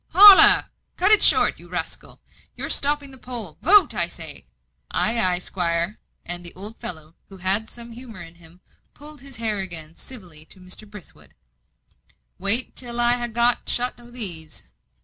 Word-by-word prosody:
"Holloa! 400 Hz, 0 st, +8 dB, 0.3 s
cut -, -, +2 dB
it 425 Hz, -, +5 dB
short, -, -, +4 dB
you -, -, -14 dB
rascal; -, -, -6 dB, 0.3 s
you're -, -, -4 dB
stopping 285 Hz, -1 st, +1 dB
the 265 Hz, -, -12 dB
poll. 235 Hz, -11 st, -8 dB
Vote, 380 Hz, -, +4 dB
I 170 Hz, -5 st, -1 dB
say." 160 Hz, -, -9 dB, 0.4 s
"Ay, 230 Hz, +2 st, 0 dB
ay, 180 Hz, -1 st, +1 dB
'squire;" 175 Hz, +1 st, -3 dB, 0.3 s
and 175 Hz, +1 st, -5 dB
the 170 Hz, -, -2 dB
old 210 Hz, +4 st, -11 dB
fellow, 160 Hz, -2 st, -8 dB, 0.2 s
who 195 Hz, -, -14 dB
had 195 Hz, +4 st, 0 dB
some 235 Hz, 0 st, -12 dB
humour 230 Hz, -3 st, -12 dB
in 165 Hz, 0 st, -14 dB
him, 170 Hz, +1 st, -19 dB, 0.3 s
pulled 300 Hz, 0 st, -14 dB
his 275 Hz, -1 st, -9 dB
hair 220 Hz, -3 st, -3 dB
again 165 Hz, -4 st, -5 dB
civilly 180 Hz, -12 st, -7 dB
to 190 Hz, -, -14 dB
Mr. 185 Hz, +3 st, -8 dB
Brithwood. 205 Hz, -6 st, -16 dB, 1.0 s
"Wait 230 Hz, +6 st, +2 dB
till 240 Hz, -1 st, -2 dB
I 240 Hz, 0 st, +3 dB
ha' 240 Hz, -, -5 dB
got 235 Hz, +2 st, 0 dB
shut 245 Hz, 0 st, 0 dB
o' 240 Hz, 0 st, -16 dB
these." 175 Hz, -10 st, -1 dB
215 Hz, 170 wpm, -21 LUFS, 175-245 Hz, 1.0 s, Holloa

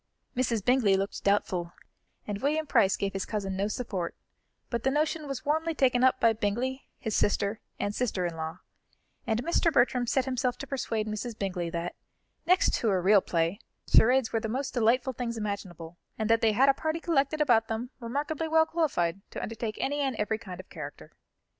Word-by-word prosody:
Mrs. 235 Hz, -5 st, 0 dB
Bingley 245 Hz, -6 st, +4 dB
looked 195 Hz, +1 st, -3 dB
doubtful, 185 Hz, -4 st, +1 dB, 0.5 s
and 205 Hz, 0 st, -4 dB
William 310 Hz, +3 st, +1 dB
Price 220 Hz, -9 st, +3 dB
gave 195 Hz, -1 st, -2 dB
his 195 Hz, -, -2 dB
cousin 195 Hz, -3 st, -3 dB
no 195 Hz, +2 st, 0 dB
support; 200 Hz, -6 st, -3 dB, 0.6 s
but 235 Hz, -2 st, -1 dB
the 265 Hz, -, +2 dB
notion 305 Hz, +2 st, 0 dB
was 275 Hz, -2 st, -5 dB
warmly 320 Hz, +2 st, 0 dB
taken 255 Hz, -3 st, +3 dB
up 260 Hz, 0 st, +4 dB
by 230 Hz, -1 st, +4 dB
Bingley, 240 Hz, +5 st, -2 dB
his 220 Hz, -2 st, -3 dB
sister 205 Hz, +1 st, +1 dB, 0.2 s
and 205 Hz, -, -1 dB
sister 205 Hz, -6 st, -1 dB
in 170 Hz, -1 st, -3 dB
law, 160 Hz, 0 st, -5 dB, 0.7 s
and 225 Hz, +1 st, 0 dB
Mr. 335 Hz, +2 st, +2 dB
Bertram 245 Hz, -3 st, +2 dB
set 265 Hz, +2 st, +1 dB
himself 255 Hz, -1 st, -1 dB
to -, -, -6 dB
persuade 230 Hz, -5 st, -2 dB
Mrs. 215 Hz, +2 st, -4 dB
Bingley 180 Hz, -5 st, -2 dB
that, 170 Hz, +1 st, -3 dB, 0.5 s
next 365 Hz, +2 st, +4 dB
to 225 Hz, -, +1 dB
a 190 Hz, -2 st, +2 dB
real 195 Hz, +2 st, +5 dB
play, 170 Hz, +3 st, 0 dB, 0.3 s
charades 250 Hz, +1 st, +5 dB
were 225 Hz, -, +2 dB
the 220 Hz, -, -4 dB
most 260 Hz, +4 st, -2 dB
delightful 245 Hz, +2 st, +2 dB
things 235 Hz, -1 st, -4 dB
imaginable, 185 Hz, -5 st, -5 dB, 0.2 s
and 220 Hz, 0 st, 0 dB
that 230 Hz, -, +4 dB
they 220 Hz, -1 st, +4 dB
had 265 Hz, +6 st, +4 dB
a 275 Hz, -, +6 dB
party 315 Hz, +3 st, -2 dB
collected 310 Hz, -3 st, +1 dB
about 240 Hz, -7 st, +4 dB
them 230 Hz, +3 st, -4 dB
remarkably 290 Hz, +6 st, -2 dB
well 320 Hz, 0 st, +4 dB
qualified 195 Hz, -, 0 dB
to -, -, -6 dB
undertake 225 Hz, -1 st, -4 dB
any 290 Hz, +2 st, -1 dB
and 270 Hz, -3 st, 0 dB
every 215 Hz, +1 st, -1 dB
kind 185 Hz, -5 st, -9 dB
of 185 Hz, -, -10 dB
character. -, -, -8 dB
230 Hz, 190 wpm, -28 LUFS, 200-265 Hz, 0.7 s, a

